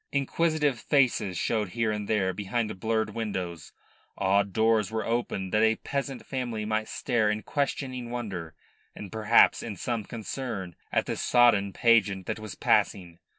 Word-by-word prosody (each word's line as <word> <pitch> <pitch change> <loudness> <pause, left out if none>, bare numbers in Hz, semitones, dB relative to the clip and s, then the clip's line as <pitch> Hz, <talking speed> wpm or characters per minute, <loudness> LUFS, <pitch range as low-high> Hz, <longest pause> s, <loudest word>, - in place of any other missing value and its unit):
Inquisitive 150 -1 +1
faces 120 -10 +1
showed 110 -4 0
here 115 -2 +2
and 105 -1 -3
there 95 -4 +1
behind 105 +1 -3
blurred 110 +1 0
windows; 95 -8 -4 0.5
odd 100 +1 +2
doors 110 -2 +2
were 110 0 -2
opened 115 -5 -2
that 105 - +4
a 110 0 +4
peasant 135 +1 -4
family 120 -5 -3
might 110 0 -1
stare 120 -5 0
in 105 0 -2
questioning 130 -3 -2
wonder 100 -10 -5 0.4
and 100 - -8
perhaps 110 +1 +4
in 110 -3 -5
some 115 +4 -2
concern 110 -6 -5 0.2
at - - +1
the - - -2
sodden 115 -5 +4
pageant 100 -4 +3
that - - -3
was 110 -4 -7
passing. 85 -3 +1
110 Hz, 150 wpm, -27 LUFS, 100-120 Hz, 0.5 s, that